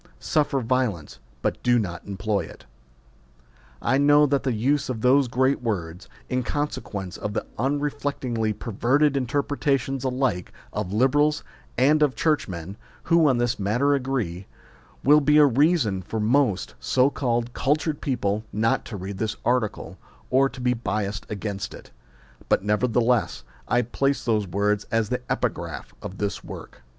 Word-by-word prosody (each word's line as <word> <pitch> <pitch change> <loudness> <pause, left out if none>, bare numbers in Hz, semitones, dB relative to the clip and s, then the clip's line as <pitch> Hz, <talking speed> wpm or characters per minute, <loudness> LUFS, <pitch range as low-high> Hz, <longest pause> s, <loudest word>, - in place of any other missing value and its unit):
suffer 145 - 0
viol 125 -4 +1
ence, 75 -5 -14 0.2
but - - -1
do 120 -1 +3
not 90 -7 -3
employ 100 +1 -1
it. - - -9 1.2
I 130 +3 +2
know 145 +1 +6
that 140 -1 +1
the 130 - -1
use 130 +6 0
of 115 -4 -3
those 130 +2 +4
great 130 +3 +1
words 90 -7 -4 0.2
in 130 0 0
consequence 105 -9 -4
of 105 - -4
the - - -2
unreflectingly 135 -4 -1
perverted 130 +8 +1
interpretations 135 0 0
alike 130 -8 -1 0.2
of 105 -3 -3
Liberals 145 +7 +2 0.3
and 150 +3 +4
of 145 -5 +3
Churchmen, 100 - -1 0.3
who 165 -3 +4
on 130 - +2
this 120 -1 0
matter 120 +9 +2
agree 125 -10 -2 0.6
will 150 +2 +6
be 150 +1 +4
a 150 - +8
reason 135 - +2
for 110 +5 -4
most 110 -3 +1
so 130 +2 +2
called 120 -3 -1
cul 140 +3 +2
tured 155 -1 -4
people 110 -6 -1
not 110 +2 +1
to 110 - -6
read 95 +1 -6
this 110 -1 -1
article, 120 -4 -1 0.3
or 135 +2 +4
to 130 - -11
be 125 0 +2
biassed 105 -3 -3
against 100 -1 -4
it; - - -14 0.6
but - - +3
nevertheless 115 - +1 0.2
I 125 0 +2
place 135 +4 -1
those 110 -4 +1
words 100 +3 0
as 115 -2 0
the 125 0 -1
epigraph - - -3
of 95 - -7
this 100 -1 -3
work. - - -10
125 Hz, 155 wpm, -24 LUFS, 105-140 Hz, 1.2 s, a